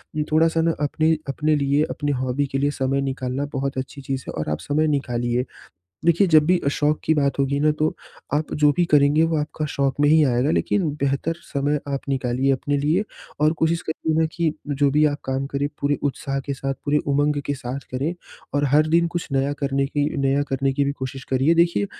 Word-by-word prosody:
उम, 155 - 0
थोड़ा-सा 165 +1 +3
ना 165 0 +2
अपने 155 +2 +2
अपने 150 +3 +1
लिए, 140 +1 +2
अपनी 145 0 -2
हॉबी 130 +3 0
के - - +1
लिए 145 +1 +1
समय 135 -1 -1
निकालना 135 0 -2
बहुत 135 0 -2
अच्छी 130 +2 -5
चीज़ 135 -1 -4
है - - -5
और 75 - -2
आप 75 - -2
समय 155 +2 +1
निकालिए। 125 -3 -1 0.6
देखिए, 170 +4 +4
जब 155 -2 +6
भी 180 +1 +4
अ, - - +2
शौक़ 150 +1 +1
की 160 - +3
बात 140 -3 0
होगी 140 0 +1
ना, 155 +1 +4
तो 155 +1 -1 0.4
आप 150 +1 -1
जो 150 -1 +4
भी 175 - +3
करेंगे 145 +1 +5
वो 165 -1 0
आपका 150 +1 -3
शौक़ 135 -1 +1
में 145 - +5
ही 155 +1 +6
आएगा, 125 +2 +1
लेकिन 180 +1 +1
बेहतर 140 +4 0 0.2
समय 145 +1 0
आप 140 -1 -2
निकालिए 130 0 +1
अपने 145 +2 -1
लिए 155 +8 +1 0.4
और 155 +1 +4
कोशिश 165 +1 +2
करिए 160 0 -2
ना 160 - +3
कि, 165 -2 0 0.2
जो 145 -1 +2
भी 150 +2 +3
आप 145 -1 +1
काम 135 +1 -2
करें 140 0 -2
पूरे 145 0 +1
उत्साह 135 0 -2
के 140 +1 -4
साथ, 135 0 -3
पूरे 145 +1 +2
उमंग 145 +1 +1
के 145 - 0
साथ 130 0 -5
करें 140 +7 -2 0.4
और 145 0 +2
हर 150 +3 +4
दिन 170 +2 +3
कुछ 170 0 -4
नया 135 +1 +1
करने 135 0 +1
की 145 +1 0
नया 135 +1 +2
करने 135 -1 -1
की 140 +1 +1
भी 140 - 0
कोशिश 135 -1 -6
करिए। 135 +5 +2
देखिए, 170 +4 +2
145 Hz, 220 wpm, -22 LUFS, 135-155 Hz, 0.6 s, जब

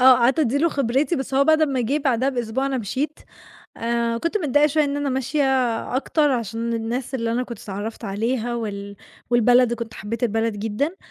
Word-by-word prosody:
آه، 260 0 +8
قعدت 245 +3 +3
أدّي 285 -2 +2
له 335 - +3
خبرتي، 275 +4 0
بس 265 0 -4
هو 275 - +4
بعد 315 +1 +4
أمّا 275 -4 +1
جِه 265 +6 0
بعديها 265 -2 +1
بأسبوع 250 0 -1
أنا 270 -1 -1
مشيت، 265 +8 -3 0.6
آآ 235 0 -1
كنت 335 - -1
متضايقة 295 -3 +3
شوية 305 0 +2
إن 285 0 -2
أنا 290 -1 -1
ماشية 265 +3 0 0.5
أكتر، 295 +2 +2
عشان 230 -1 -2
الناس 235 +4 -3
اللي 230 -3 -1
أنا 245 - 0
كنت 240 -2 -7
اتعرّفت 210 +3 -6
عليها 230 +4 -1
وال 200 -3 -5 0.3
والبلد، 245 0 +4
كنت 230 -1 -7
حبيت 225 +5 -5
البلد 225 -1 0
جدًا، 225 - -2
245 Hz, 190 wpm, -22 LUFS, 230-275 Hz, 0.6 s, آه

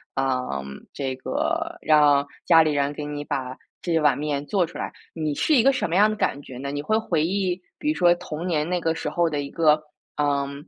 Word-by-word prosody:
嗯， 125 - -2
这 135 -2 -3
个 130 - -2
让 145 -2 +4 0.2
家 165 -2 +7
里 155 -1 +2
人 145 0 0
给 150 - -6
你 145 0 -5
把 130 -3 -4 0.2
这 165 -2 +1
碗 150 -4 +3
面 145 -1 -2
做 190 +3 +1
出 - - -10
来， - - -4 0.2
你 155 -2 -2
是 305 - +2
一 240 - +5
个 275 +2 +5
什 255 - -1
么 170 - -1
样 205 +3 +6
的 215 - -2
感 140 -8 -1
觉 125 -2 -10
呢？ 140 +1 -4
你 145 0 -4
会 215 - +1
回 165 -8 0
忆 185 0 -1 0.2
比 300 - -1
如 - - -2
说 175 -1 +5
童 160 -1 -6
年 160 -3 0
那 180 0 0
个 165 -1 0
时 160 - -4
候 170 +3 +1
的 150 -3 -1
一 140 - -6
个， 155 -1 +3 0.4
嗯， 140 0 -1
150 Hz, 245 characters per minute, -24 LUFS, 140-175 Hz, 0.4 s, 家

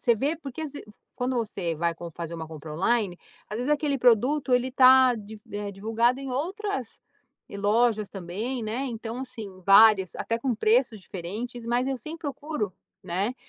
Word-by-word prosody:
você 235 -2 +4
vê, 285 +8 0
porque 295 -1 -7
às 300 - -5
v 285 - -8 0.3
quando 250 0 -1
você 200 -7 -2
vai 170 +1 0
com 170 +1 -8
fazer 170 +1 -6
uma 160 -1 -6
compra 155 -1 -8
online, 195 +1 +1 0.3
às 210 - -4
vezes 250 +4 -1
aquele 290 -2 0
produto 255 +4 +3
ele 250 +1 +2
tá 255 -1 +7
div 215 0 -9
eh, 205 0 -3
divulgado 225 +5 +1
em 275 -1 -6
outras 320 - -3 0.5
e - - -8
lojas 215 +1 +2
também, 205 +7 -4
né. 230 +5 -2
Então, 230 -1 -5
assim, 220 -8 -8
várias, 195 -2 +7
até 230 0 -2
com 250 0 0
preços 225 +1 +2
diferentes, 215 +7 -6
mas 240 +2 +1
eu 265 -1 -1
sempre 320 +5 -8
procuro, 285 - -3 0.3
né, 195 +8 -2
230 Hz, 180 wpm, -26 LUFS, 200-260 Hz, 0.5 s, tá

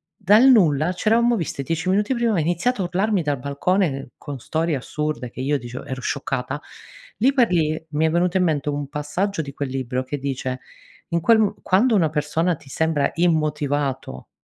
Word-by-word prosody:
Dal 215 +6 +5
nulla, 170 - +4
c' 185 - -8
eravamo 235 +2 +4
visti 165 -7 -3
10 165 +6 -2
minuti 205 +6 +2
prima, 235 -2 +1
ha 185 - +1
iniziato 175 +9 0
a 180 - 0
urlarmi 190 +2 0
dal 145 -3 -1
balcone 140 +1 -1
con 140 -2 -7
storie 160 +5 -1
assurde, 150 -1 -3
che 120 - -12
io 145 +2 +1
dicevo 120 +1 -8
ero 130 -1 -5
scioccata, 135 +1 -3 0.6
lì 260 +6 +3
per 245 -6 +3
lì 155 -2 +1
mi 155 +1 +1
è - - +1
venuto 175 +3 +1
in 185 - +3
mente 150 -4 0
un 145 -1 -3
passaggio 160 +6 -2
di 140 -1 -8
quel 140 0 -4
libro 130 -1 -2
che 130 +3 -4
dice: 130 -2 -3 0.5
in 170 0 0
quel 225 +7 +5
m 215 -2 +2
quando 225 +6 +3
una 165 -6 +3
persona 155 +3 0
ti 145 - -19
sembra 160 -1 0
immotivato 145 - -1
155 Hz, 190 wpm, -22 LUFS, 140-185 Hz, 0.6 s, Dal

